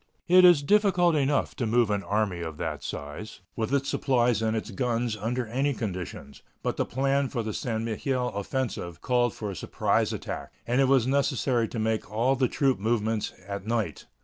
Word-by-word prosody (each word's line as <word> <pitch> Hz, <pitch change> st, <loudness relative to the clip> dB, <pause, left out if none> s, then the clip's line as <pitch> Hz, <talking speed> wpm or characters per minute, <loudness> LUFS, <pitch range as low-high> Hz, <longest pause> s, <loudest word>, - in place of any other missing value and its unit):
It 185 Hz, +1 st, +7 dB
is 175 Hz, -5 st, +7 dB
difficult 185 Hz, -1 st, +4 dB
enough 145 Hz, -1 st, +1 dB
to 120 Hz, -, -1 dB
move 115 Hz, -1 st, +3 dB
an 100 Hz, -1 st, 0 dB
army 100 Hz, -3 st, -1 dB
of 80 Hz, -3 st, -5 dB
that -, -, -3 dB
size, 75 Hz, +11 st, -7 dB
with 110 Hz, +1 st, -2 dB
its 140 Hz, -1 st, +1 dB
supplies 120 Hz, -6 st, +2 dB
and 110 Hz, 0 st, +1 dB
its 110 Hz, +1 st, -5 dB
guns, 120 Hz, +2 st, -1 dB
under 120 Hz, +4 st, -2 dB
any 135 Hz, +5 st, 0 dB
conditions, 90 Hz, -, -6 dB, 0.2 s
but -, -, -1 dB
the -, -, 0 dB
plan 135 Hz, +1 st, +1 dB
for 120 Hz, -3 st, -2 dB
the 110 Hz, -1 st, -3 dB
St. 110 Hz, -1 st, -2 dB
Mihiel 125 Hz, +1 st, -2 dB
offensive 100 Hz, -5 st, -3 dB
called 120 Hz, -2 st, +1 dB
for 105 Hz, -2 st, -4 dB
a -, -, -7 dB
surprise -, -, 0 dB
attack, -, -, -5 dB
and 125 Hz, +3 st, +2 dB
it 135 Hz, -, +4 dB
was 130 Hz, -3 st, +4 dB
necessary 130 Hz, -3 st, +1 dB
to 115 Hz, -, -7 dB
make 110 Hz, -1 st, -1 dB
all 120 Hz, +5 st, +2 dB
the 130 Hz, -1 st, +2 dB
troop 135 Hz, -3 st, +1 dB
movements 110 Hz, 0 st, 0 dB, 0.2 s
at 100 Hz, 0 st, -5 dB
night. 115 Hz, -2 st, -2 dB
120 Hz, 190 wpm, -27 LUFS, 110-135 Hz, 0.2 s, It